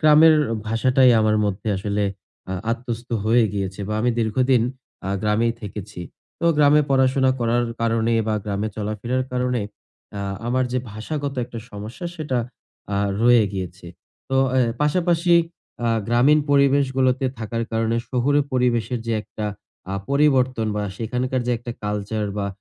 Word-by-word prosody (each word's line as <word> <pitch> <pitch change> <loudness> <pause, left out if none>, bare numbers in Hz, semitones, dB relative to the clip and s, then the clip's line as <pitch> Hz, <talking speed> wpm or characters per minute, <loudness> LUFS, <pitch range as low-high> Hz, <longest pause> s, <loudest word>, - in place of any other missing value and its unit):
গ্রামের 155 +1 +7 0.3
ভাষাটাই 125 +3 +4
আমার 110 0 +3
মধ্যে 100 +2 -2
আসলে 100 +1 -1 0.5
আ - - -1 0.2
আত্মস্ত 120 0 -4 0.2
হয়ে 115 +1 +4
গিয়েছে। 95 -1 -3
বা 105 - -1
আমি 120 +2 +2
দীর্ঘদিন 120 +2 +2 0.5
আ - - -1
গ্রামেই 110 +2 +2
থেকেছি। 105 -2 -7 0.4
তো - - -2
গ্রামে 150 0 +5
পড়াশোনা 130 0 +3
করার 120 +1 +2 0.2
কারণে 115 0 +1 0.2
বা 110 - +1
গ্রামে 105 +1 -2
চলাফেরা 110 +4 -2 0.2
কারণে 125 -2 0 0.6
আ - - -3 0.3
আমার 130 +2 +1
যে 125 - +1
ভাষাগত 140 +6 -4
একটা 120 -1 -8
সমস্যা, 110 - -7
সেটা 145 -6 -1 0.6
আ 100 - +1 0.2
রয়ে 120 -1 +6
গিয়েছে। 90 -2 -6 0.4
তো 135 - +1 0.2
এ্যা 120 -3 +2
পাশাপাশি 170 +2 +2 0.5
আ - - +2 0.2
গ্রামীণ 130 +6 +5
পরিবেশগুলোতে 135 -2 +3
থাকার 115 +1 -3
কারণে 115 +1 +1
শহুরে 140 +3 +2
পরিবেশের 120 -1 +1
যে 115 - 0
একটা 105 0 -6 0.5
আ - - -1 0.2
পরিবর্তন 130 -5 +2
বা 105 - -1
সেখানকার 125 +3 -1
যে 125 - +2
একটা 120 +1 -6
কালচার 105 +1 -2
বা 100 - -1
120 Hz, 145 wpm, -22 LUFS, 110-130 Hz, 0.6 s, গ্রামের